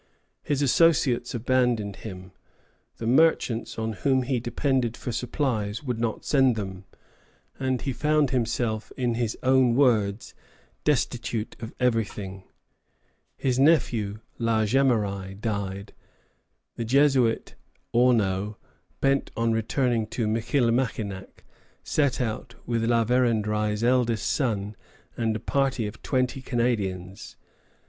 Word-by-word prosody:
His 145 -1 -1
associates 130 -4 +3
abandoned 120 -4 +1
him; 95 -3 -9 0.7
the 115 - -5
merchants 125 -3 +2
on 110 0 -2
whom 130 +6 +1
he 125 -1 0
depended 120 0 -1
for 125 - -5
supplies 115 -3 -2
would 125 -4 -3
not 115 -2 -2
send 135 -4 +3
them, 95 -3 -6 0.7
and 130 -1 0
he 135 - -2
found 150 +2 +2
himself, 115 -3 -1
in 125 -2 0
his 115 -1 -2
own 130 -2 +4
words 110 -6 +2 0.5
"destitute 120 -5 -1
of 115 0 -7
everything." 105 -6 -1 0.9
His 130 -1 0
nephew, 115 -9 +2 0.2
La 115 -2 +2
Jemeraye, 105 -6 0
died. 100 -3 -4 0.8
The 115 - -2
Jesuit 130 -2 +2 0.4
Auneau, 105 -4 +2 0.4
bent 135 0 +2
on 115 0 +1
returning 115 0 0
to 115 +1 -2
Michillimackinac, 115 -3 -1 0.4
set 140 -4 +1
out 120 0 -3
with 115 -1 0
La 115 -1 +2
Vérendrye's 105 -3 +1
eldest 120 -3 +2
son 105 -6 -1 0.4
and 110 -2 0
a - - -2
party 135 -4 0
of 105 +1 -7
twenty 130 0 -1
Canadians. 105 -7 -2
115 Hz, 115 wpm, -26 LUFS, 110-130 Hz, 0.9 s, own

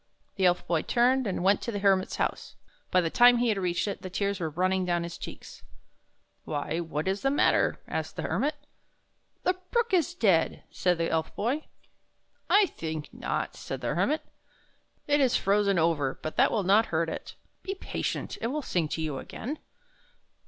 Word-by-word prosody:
The 190 -2 +3
Elf 180 0 +1
Boy 165 -3 +1
turned 255 +1 +2
and 185 -2 -2
went 195 +1 +4
to 235 - -3
the 205 - -3
Hermit's 195 -2 +2
house. - - -3 0.3
By 185 - +4
the 165 -2 -1
time 245 0 +7
he 240 0 +2
had 210 -3 +1
reached 180 +1 0
it, 200 - -4
the 185 - -6
tears 200 +1 -1
were 165 -2 -1
running 185 +4 +1
down 175 -1 0
his 170 0 -6
cheeks. - - -9 0.4
" - - -44
Why, 150 +2 -2
what 160 -1 -3
is 195 +1 0
the 270 - +2
matter? 285 - +3
" - - -36
asked - - -4
the - - -4
Hermit. 295 +2 0 0.5
" - - -45
The 365 - +3 0.2
brook 470 -4 +1
is 350 -1 +2
dead," 185 - +2
said 180 -2 +1
the 165 0 -1
Elf 160 -1 -1
Boy. 260 +9 -1 0.4
" - - -43
I 410 0 +6
think 160 - -5
not," - - -3
said - - -6
the - - -1
Hermit. 305 +2 +1 0.8
"It 290 0 +3
is 260 -3 +4
frozen 200 -1 +2
over, 160 -5 +1
but 155 - -4
that - - +5
will 210 - 0
not 205 +5 +4
hurt 165 0 0
it. 160 - -6 0.3
Be 390 0 -4
patient, - - -4
and - - -5
it - - +2
will 295 +4 -2
sing 175 -9 0
to 160 +1 -3
you 150 -4 -3
again." 290 +7 -6
195 Hz, 200 wpm, -28 LUFS, 170-245 Hz, 0.8 s, time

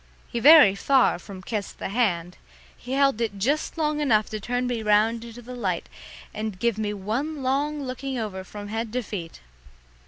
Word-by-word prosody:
He 235 - -1
very 290 -6 +8
far 260 +1 +3
from 185 0 -10
kissed 210 0 -4
the - - -4
hand; 180 -6 0 0.4
he 250 - -7
held 275 -4 +2
it 220 -3 -2
just 280 - -1
long 305 -1 0
enough 220 -8 +2
to 215 - -3
turn 245 +4 -2
me 245 -2 -2
round 220 +2 +2
into 235 +1 -10
the 250 +2 -9
light 195 -8 -2 0.5
and 215 -2 -4
give 230 +1 0
me 210 -1 -1
one 245 +9 -3
long 285 +3 0
looking 260 0 -4
over 205 -5 -4
from 205 +2 -9
head 225 +1 -3
to 250 0 -1
feet. 175 -6 -7
230 Hz, 185 wpm, -25 LUFS, 205-260 Hz, 0.5 s, very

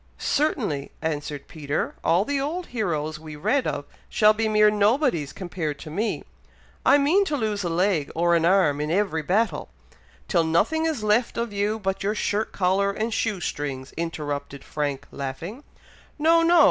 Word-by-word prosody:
"Certainly," 230 - 0
answered 145 -2 -3
Peter. 150 -2 -3
"All 180 +5 +3
the 280 +1 -1
old 335 +6 -3
heroes 155 -8 -1
we 155 -1 -9
read 255 - +1
of 145 0 -3 0.2
shall 215 0 +5
be 220 +1 0
mere 210 0 +5
nobodies 210 - +2
compared 170 -6 -4
to 155 - -9
me! 210 +8 -1 0.6
I - - +6
mean 310 +8 +4
to 300 -5 -1
lose 215 -4 -1
a 175 - -1
leg 170 -3 +1
or 170 +1 +3
an 165 -1 +3
arm 170 -5 +3
in 150 - -2
every 180 -2 +1
battle," 205 +9 0 0.6
"Till 170 -4 +3
nothing 220 - +2
is 295 -9 -2
left 215 +3 +2
of 235 -2 -2
you 205 +2 0
but 195 -2 -2
your 205 +2 0
shirt 210 +1 -1
collar 195 +1 +2
and 220 +3 -2
shoe 215 -3 0
strings," 140 -4 -4
interrupted 145 -4 -4
Frank, 145 -3 -3
laughing. 165 - -6 0.5
"No! 325 +2 +4
No! 335 +1 +5
195 Hz, 170 wpm, -25 LUFS, 155-225 Hz, 0.6 s, I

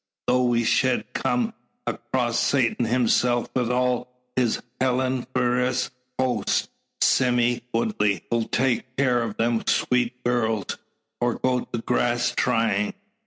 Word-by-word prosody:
Tho' 125 0 +3
we 120 -1 +2
shed 130 +2 +1
kum 235 -2 0 0.3
across 120 -2 -1
Satan 125 -3 +2
hisself 120 0 +2
wi' 125 -2 +1
all 125 0 +1 0.3
his 125 -3 +1 0.2
hellniferous 125 0 0 0.3
host, 130 -1 0 0.3
Sime 120 -2 +3
Woodley 105 -5 0
'll 115 -1 +1
take 125 0 -1
care 125 -3 +2
o' 115 -2 -2
them 115 +1 0
sweet 125 0 +1
gurls, 115 -4 0 0.4
or 120 -1 +1
go 125 -1 0
to - - -5
grass 120 0 +1
trying." 115 -4 +1
125 Hz, 120 wpm, -24 LUFS, 115-125 Hz, 0.4 s, Tho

